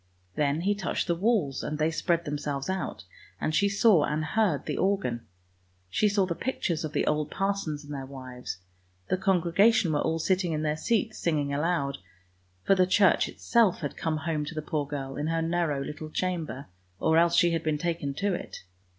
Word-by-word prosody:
Then 150 +1 +1
he 200 +3 +2
touched 200 -3 -2
the 170 - +1
walls 175 - +1
and 150 - -3
they 155 +1 +1
spread 170 +1 0
themselves 145 +1 -3
out, 190 0 -4 0.4
and 155 - -1
she 200 +5 +3
saw 200 -5 +5
and 150 +1 -1
heard 180 -3 +1
the - - -2
organ. 190 -12 0 0.6
She 210 - +3
saw 200 -1 +2
the 180 - -2
pictures 175 -7 -2
of 155 -1 -4
the 150 - +1
old 150 0 0
parsons 195 -6 -2
and 145 0 -8
their 135 -2 -5
wives; 130 -6 -7 0.5
the 185 - +2
congregation 190 0 +3
were 145 - +1
all 160 0 0
sitting 180 +1 +1
in 155 0 -1
their 150 0 0
seats 220 +6 0
singing 145 -4 0
aloud 145 - 0 0.3
— 90 0 -39
for - - +5
the 185 -1 +3
church 195 0 +4
itself 225 -7 +2
had 145 - -4
come 160 -1 -1
home 155 0 -2
to 160 - -7
the 155 - -3
poor 150 -2 -2
girl, 135 -2 -5
in 150 +1 -2
her 165 0 0
narrow 165 -4 0
little 155 +2 -7
chamber, 165 -6 -3 0.3
or 160 +9 +3
else 170 0 +3
she 170 0 +5
had 165 -1 0
been 155 -2 0
taken 150 -3 -2
to 200 +4 0
it. 175 - -6
160 Hz, 200 wpm, -28 LUFS, 145-185 Hz, 0.6 s, saw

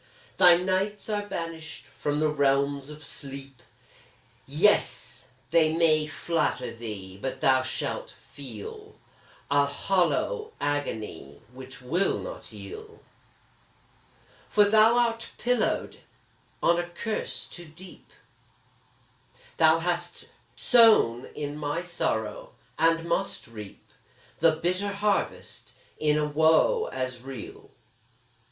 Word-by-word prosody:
Thy 175 -1 +8
nights 190 +4 -1
are 205 -1 -2
banished 165 - -6
from 145 +2 -3
the 155 0 +2
realms 140 -1 +1
of 150 0 -10
sleep: 135 -2 -7 0.9
Yes! 170 +10 +1 0.2
they 160 -1 +4
may 155 -2 +3
flatter 155 -7 -1
thee, 100 -5 -7
but 135 - -4
thou 130 -1 +4
shall - - -3
feel 435 -3 -10 0.6
A 145 0 +4
hollow 195 - 0
agony 110 - -3
which 130 0 -11
will 175 +10 +1
not - - -8
heal, 435 +1 -10 1.5
For 210 - +5
thou 220 +3 +5
art 230 -1 0
pillowed 245 0 0 0.6
on 170 0 +4
a 175 0 -3
curse 215 +6 -3
too 175 - -10
deep; 175 +4 -15 1.5
Thou 160 0 +6
hast 175 0 -3 0.2
sown 220 - +5
in 145 0 -4
my 150 +3 -2
sorrow, 160 -12 -3 0.3
and 165 +1 +3
must 180 +3 -1
reap 105 -4 -11 0.5
The 165 -1 +5
bitter 185 +5 -1
harvest 200 0 -2 0.3
in 150 -1 +2
a 150 - +1
woe 160 - +3
as 130 -1 -4
real! 130 -3 -9
160 Hz, 105 wpm, -27 LUFS, 140-195 Hz, 1.5 s, Thy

